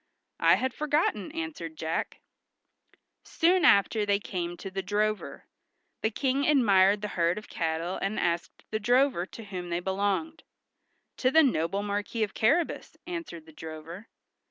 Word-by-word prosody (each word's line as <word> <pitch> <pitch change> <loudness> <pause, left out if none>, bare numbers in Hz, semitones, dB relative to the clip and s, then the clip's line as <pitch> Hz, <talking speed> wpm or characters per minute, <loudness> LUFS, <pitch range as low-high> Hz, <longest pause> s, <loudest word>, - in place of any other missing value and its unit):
"I - - +6
had 260 -1 -1
forgotten," 300 - 0
answered 315 - -5
Jack. 160 +1 -3 1.0
Soon 355 +2 +2
after 210 +2 +5
they 200 -1 +2
came 175 -4 -4
to 195 - -7
the 195 0 -2
drover. 210 +2 -2 0.6
The 220 - +2
King 270 +4 0
admired 205 -8 +4
the 210 - -2
herd 170 0 +1
of 210 - -7
cattle 165 +1 -2
and 195 +2 -1
asked 170 0 -2
the 215 - -1
drover 245 -4 +2
to 225 - -10
whom 185 -4 -6
they 170 0 -1
belonged. 200 - -1 0.8
"To 255 - +2
the 320 +4 +6
noble 195 - +1
Marquis 205 +2 -2
of 205 - -3
Carrabas," 300 +10 0
answered 335 - -6
the 160 - -15
drover. 160 +6 -9
205 Hz, 150 wpm, -28 LUFS, 175-255 Hz, 1.0 s, I